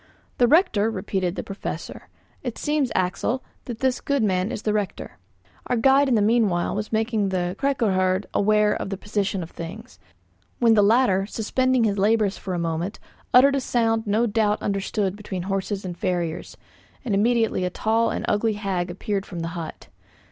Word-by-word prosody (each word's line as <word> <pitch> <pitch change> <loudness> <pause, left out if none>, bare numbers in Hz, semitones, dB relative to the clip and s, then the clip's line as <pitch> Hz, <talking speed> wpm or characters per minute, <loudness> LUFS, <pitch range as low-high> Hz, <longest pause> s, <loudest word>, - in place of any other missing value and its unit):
"The 245 - +5
rector," 230 - +3
repeated 190 -3 -2
the - - -4
Professor. 195 0 -7 0.3
"It 245 -4 -5
seems, 295 -4 0
Axel, 190 +7 0 0.2
that 235 -3 -7
this 260 -1 +1
good 280 -4 0
man 190 +1 +1
is 210 - -5
the 210 - 0
rector." 205 - -4 0.5
Our - - +1
guide 270 +4 +4
in 245 - +3
the 210 - +3
meanwhile 210 -6 +2
was 210 +1 -4
making 220 -2 0
the 180 -1 -1
'kyrkoherde' 195 -9 +1
aware 210 0 +3
of - - -4
the 195 - -3
position 205 -2 -2
of 165 - -10
things; 210 +9 -9 0.6
when 230 -2 +4
the 210 - +5
latter, 200 -3 +3
suspending 255 +3 +1
his 205 -2 +1
labours 210 0 +2
for 185 -2 -5
a - - -2
moment, 170 +4 -3 0.3
uttered 275 +3 +6
a 275 - 0
sound 225 -3 0
no 215 +4 +2
doubt 210 -1 +1
understood 200 -1 -1
between 195 -3 -5
horses 195 +1 -3
and 180 -2 -5
farriers, 175 -5 -2 0.5
and 225 - -1
immediately 225 -1 +2
a 180 - 0
tall 225 +4 +1
and - - -3
ugly 215 +1 +1
hag 195 -4 -2
appeared 195 +2 -3
from 175 -3 -6
the 165 - -3
hut. 165 -2 -7
210 Hz, 175 wpm, -24 LUFS, 190-230 Hz, 0.6 s, uttered